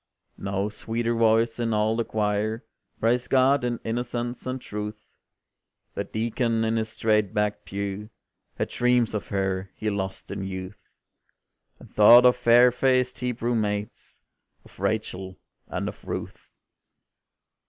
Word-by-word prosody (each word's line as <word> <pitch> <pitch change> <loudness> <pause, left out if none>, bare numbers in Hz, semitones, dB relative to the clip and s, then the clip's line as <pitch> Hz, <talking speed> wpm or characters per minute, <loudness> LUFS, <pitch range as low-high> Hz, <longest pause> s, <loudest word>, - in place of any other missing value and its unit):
No 100 0 -1
sweeter 115 +2 -2
voice 115 0 +2
in 115 -2 0
all 105 +1 +2
the 115 - 0
choir 110 +1 -1 0.3
Praised 120 +2 +1
God 135 +1 +4
in 120 -1 -1
innocence 120 +1 -3
and 130 +1 -3
truth, 105 -1 -6 0.9
The - - -2
Deacon 115 0 -1
in 110 +1 +1
his 110 0 -1
straight 110 -3 +1
backed 105 0 -1
pew 100 +1 -4 0.5
Had - - -2
dreams 125 -2 +2
of 105 -5 -3
her 95 -1 -2
he 110 -1 -2
lost 95 -1 -4
in - - -4
youth, 95 +1 -7 0.9
And - - -16
thought 120 +4 +8
of 125 - +6
fair 125 0 +6
faced 125 0 +1
Hebrew 120 -1 -1
maids 105 -2 -3 0.5
Of - - -19
Rachel, 95 0 -2 0.3
and - - -3
of - - -8
Ruth. - - -6
110 Hz, 135 wpm, -25 LUFS, 105-120 Hz, 0.9 s, thought